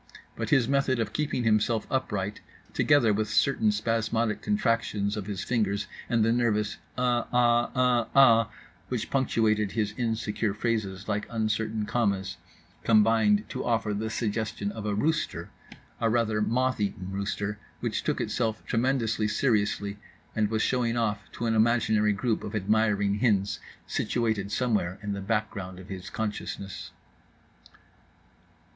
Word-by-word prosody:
But 115 -1 -3
his 130 -5 +4
method 135 -2 +1
of 110 -2 -2
keeping 150 -5 -1
himself 110 0 +2
upright, 105 -6 -2 0.3
together 145 -8 +4
with 110 +1 -1
certain 110 -6 +3
spasmodic 115 +1 0
contractions 115 - 0
of 105 -2 -5
his 100 -4 -3
fingers 105 -4 0 0.2
and 115 -2 +3
the 115 - +3
nervous 110 -3 +1 0.2
"uh 120 -2 +1
ah, 120 -1 +3
uh 125 -2 +3
ah" 115 -4 +6 0.4
which 120 -3 -3
punctuated 110 -6 +1
his 105 -1 -1
insecure 110 -3 -1
phrases 105 -4 -2
like 105 -1 -1
uncertain 110 -1 -1
commas, 100 -5 -1 0.5
combined 110 -1 +4
to - - -4
offer 115 -3 0
the 110 +2 -2
suggestion 110 -2 -2
of 105 -1 -6
a 105 - 0
rooster; 155 +9 -1 0.5
a 115 - +2
rather 110 -2 +1
moth 130 +3 +1
eaten 95 -2 -3
rooster, 105 +1 -3 0.2
which - - -2
took - - -1
itself 110 -3 -1
tremendously 115 -3 +1
seriously 105 -3 0 0.4
and 105 -2 +1
was 110 0 0
showing 120 -2 +1
off 105 -3 0
to 120 - -4
an 115 - +1
imaginary 110 -2 +3
group 110 +3 -1
of 105 - -5
admiring 105 -1 +1
hens 105 -4 +1 0.3
situated 110 -4 -1
somewhere 105 -8 0
in 100 0 -2
the 100 - -4
background 100 -3 -2
of 95 +1 -12
his 95 -2 -6
consciousness. 105 -4 -5
110 Hz, 140 wpm, -27 LUFS, 105-120 Hz, 0.5 s, ah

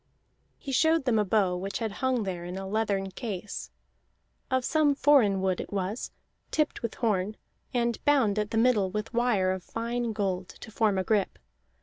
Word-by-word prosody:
He 275 - -7
showed 320 +2 +3
them 235 -4 +3
a - - +3
bow 195 -2 +2
which 195 +2 -3
had 225 -2 -2
hung 255 +1 0
there 180 -3 -4
in 180 +2 -5
a 195 - -5
leathern 200 -2 -1
case. 205 -3 -5 0.8
Of 260 -1 +1
some 300 -2 +3
foreign 240 -10 +4
wood 185 -1 +1
it - - -9
was, 200 +3 -2 0.4
tipped 305 -1 0
with 230 - -3
horn, 210 -3 0 0.3
and 235 -2 -1
bound 255 -8 +3
at 210 0 -1
the 225 - -2
middle 225 -5 +3
with 215 +5 -4
wire 230 -6 +2
of 190 0 -3
fine 235 +2 -2
gold 190 -3 -2
to 220 - -9
form 215 -2 +2
a 190 - +1
grip. 205 0 0
215 Hz, 185 wpm, -28 LUFS, 195-245 Hz, 0.8 s, foreign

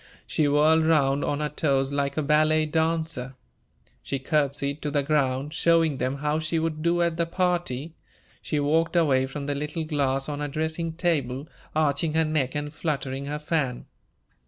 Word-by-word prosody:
She 155 - +1
whirled 155 +3 +4
round 140 -3 +3
on 145 +1 -1
her 150 - -1
toes 140 -2 0
like 140 0 -1
a 155 - +1
ballet 155 +1 +3
dancer. 160 -4 -1 0.7
She 140 - -3
courtesied 140 +1 0
to 150 - -2
the 145 -1 +1
ground, 140 -1 0
showing 165 -4 +3
them 130 +2 -1
how 150 +2 -1
she 160 +1 -1
would 160 -1 -1
do 170 +1 +2
at 170 -1 0
the 170 -1 0
party. 170 -5 -1 0.5
She 150 - -1
walked 165 +4 +1
away 135 -6 +3
from 140 +1 -6
the 145 - -1
little 150 +3 -3
glass 135 -3 0
on 145 -1 -4
her 145 - -2
dressing 160 +3 -2
table, 145 -5 -1 0.3
arching 155 +1 +1
her 160 0 +3
neck 150 -3 -1
and 145 0 -3
fluttering 140 -4 -3
her 145 +1 -3
fan. 150 -5 -2
150 Hz, 175 wpm, -26 LUFS, 140-160 Hz, 0.7 s, whirled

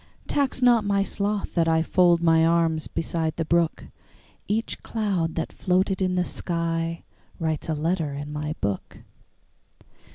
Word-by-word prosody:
Tax 270 -2 0
not 240 -3 +5
my 200 -1 +2
sloth 200 0 -2
that 165 -2 +2
IFold 170 +2 +3
my 165 -1 +5
arms 165 -1 +2
beside 160 -1 -2
the 165 - -2
brook; 170 0 +1 0.6
Each 220 +2 -2
cloud 195 -8 -1
that 165 - -3
floated 190 +1 +1
in 185 -1 +1
the 180 - +2
skyWrites 165 -2 -3
a 160 - +1
letter 160 0 -1
in 145 +1 -6
my 150 +1 -3
book. 100 -2 -4
170 Hz, 135 wpm, -25 LUFS, 160-190 Hz, 0.6 s, not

